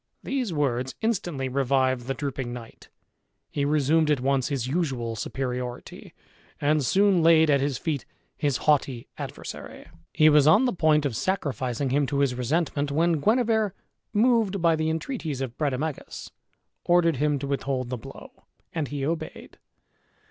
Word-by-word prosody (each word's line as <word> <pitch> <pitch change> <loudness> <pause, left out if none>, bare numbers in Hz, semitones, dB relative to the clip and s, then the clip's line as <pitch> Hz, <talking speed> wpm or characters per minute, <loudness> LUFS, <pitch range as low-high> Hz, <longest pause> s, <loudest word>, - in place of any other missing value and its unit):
These 260 -7 -2
words 130 -4 -1
instantly 175 - -1
revived 130 -1 +1
the 135 - -1
drooping 135 -3 -4
knight; 120 -2 -10 0.6
he 140 - -1
resumed 150 +2 +2
at 150 -3 +2
once 135 0 +1
his 135 -5 -2
usual 130 -6 -2
superiority, 125 +1 -5 0.4
and 150 0 +2
soon 195 +6 +3
laid 160 -1 +5
at 140 -1 +3
his 140 -2 -1
feet 145 -1 -2 0.3
his 145 -4 0
haughty 135 -5 +1
adversary. - - -8 0.3
He 155 - +4
was 150 -1 +6
on 210 +11 +6
the 250 - +1
point 155 -4 +3
of 130 -5 -1
sacrificing 130 - -1
him 140 +1 +2
to 140 - -2
his 140 -2 +2
resentment, 145 +3 -1
when 165 +1 +2
Guenever, 220 - +2 0.4
moved 220 -3 +2
by 165 -1 +3
the 155 0 -1
entreaties 160 - -3
of 130 -3 -4
Brademagus, 150 0 -3 0.5
ordered 170 -4 +3
him 150 +1 +1
to 140 - -5
withhold 135 -2 -2
the 125 - -2
blow, 110 - -13 0.3
and 160 -4 -2
he 140 -1 -3
obeyed. 165 +2 -5
145 Hz, 150 wpm, -26 LUFS, 130-165 Hz, 0.6 s, was